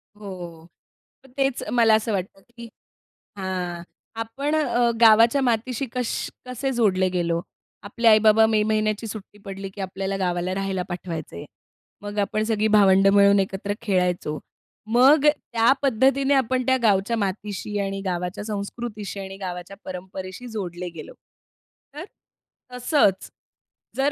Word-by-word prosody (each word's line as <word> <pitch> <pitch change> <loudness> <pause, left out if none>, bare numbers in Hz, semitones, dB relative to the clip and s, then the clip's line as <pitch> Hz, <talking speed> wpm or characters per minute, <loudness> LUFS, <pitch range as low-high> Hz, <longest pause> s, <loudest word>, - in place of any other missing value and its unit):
हो. 180 -5 -9 0.7
तेच 270 -2 0
मला 230 -2 +4
असं 220 +1 -1
वाटतं, 195 0 -4 0.2
की 235 0 -8 0.7
हां, 180 -3 -4 0.4
आपण 275 +7 -2
अ, 245 -6 +2
गावाच्या 230 +4 +6
मातीशी 245 +1 0
कश 250 -2 -1 0.4
कसे 255 +2 -3
जोडले 195 -7 +2
गेलो? 170 -2 -1 0.4
आपले 230 +3 -1
आई-बाबा 220 0 +6
मे 220 -1 +2
महिन्याची 215 0 0
सुट्टी 210 -1 -9
पडली, 195 0 -6
की 195 +1 -9
आपल्याला 195 +1 -3
गावाला 180 -1 -1
राहायला 195 -1 -2
पाठवायचे. 165 - -6 0.6
मग 205 0 -7
आपण 215 +1 0
सगळी 220 -1 +1
भावंडं 195 -2 +5
मिळून 200 0 +5
एकत्र 195 +1 -2
खेळायचो. 180 -7 -1 0.5
मग 265 +6 +5
त्या 235 -6 +2
पद्धतीने 270 +1 +2
आपण 255 -1 +1
त्या 260 0 +3
गावच्या 215 +1 +2
मातीशी 205 0 -3
आणि 195 0 -3
गावाच्या 180 +1 -3
संस्कृतीशी 210 -1 -5
आणि 195 0 -7
गावाच्या 180 0 -7
परंपरेशी 185 +4 -7
जोडले 180 -5 -5
गेलो. 165 -3 -10 0.8
तर, 305 +4 -7 0.7
तसंच 245 - +1 0.7
जर 275 +2 +1
205 Hz, 125 wpm, -23 LUFS, 190-235 Hz, 0.8 s, गावाच्या